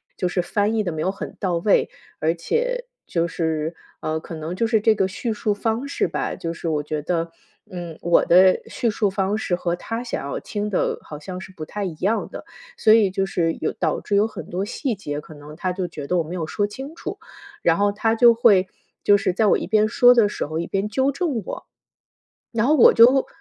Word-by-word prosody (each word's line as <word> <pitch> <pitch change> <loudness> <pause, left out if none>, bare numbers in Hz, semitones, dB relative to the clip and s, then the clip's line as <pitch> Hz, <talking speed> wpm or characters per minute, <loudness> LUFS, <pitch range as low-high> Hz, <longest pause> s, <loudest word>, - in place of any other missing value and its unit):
就 180 - -1
是 180 - 0
翻 205 +4 0
译 220 - +2
得 175 -4 -3
没 155 - -4
有 185 - +1
很 195 - -8
到 180 -3 0
位。 195 +4 +2 0.3
而 160 +1 +1
且， - - -2 0.2
就 170 0 0
是， 160 -1 -2 0.2
呃， 155 0 -2
可 165 - -10
能 160 +3 -5
就 230 - 0
是 225 -1 +2
这 215 +1 +3
个 195 -2 +1
叙 225 +3 -3
述 210 0 -1
方 225 +5 -2
式 - - 0
吧， - - -3
就 165 0 -4
是 170 - -6
我 150 -2 0
觉 150 0 -3
得， 165 +1 -2 0.4
嗯， 175 -3 -7
我 170 0 +3
的 185 +2 +6
叙 235 - -1
述 210 -1 +1
方 195 +2 -1
式 180 -4 -1
和 175 -1 -2
他 230 +5 -4
想 235 - -4
要 - - -3
听 210 0 -3
的， 195 - 0
好 150 - -9
像 180 +5 -7
是 190 0 -11
不 155 - -7
太 205 +4 -4
一 175 - -4
样 200 +8 0
的。 - - -8 0.3
所 215 - +4
以 215 -4 +5
就 195 +1 -1
是 165 -4 0
有 155 - 0
导 160 -3 -1
致 205 - -1
有 210 +2 +3
很 - - -9
多 185 +3 -2
细 245 +2 -3
节， 150 -6 -5
可 155 - -13
能 150 +1 -12
他 185 +2 -2
就 180 0 -3
觉 150 -4 -8
得 180 - +1
我 170 - +2
没 165 +3 -7
有 170 -3 -2
说 205 +6 -1
清 270 +8 -8
楚， - - -6 0.4
然 165 -1 +3
后， 205 0 +2
他 225 +2 +1
就 235 0 +7
会 205 -5 +4 0.4
就 205 - +6
是 185 - 0
在 215 +3 +2
我 - - +4
一 - - -4
边 215 0 +3
说 245 +2 +6
的 230 -4 +4
时 - - -3
候 155 +2 -4
一 170 - -3
边 195 +1 -1
纠 265 +5 +1
正 280 -5 -2
我。 - - -7 0.9
然 230 0 +1
后 300 - +4
我 250 - +8
就 255 +4 +6
195 Hz, 255 characters per minute, -22 LUFS, 170-220 Hz, 0.9 s, 我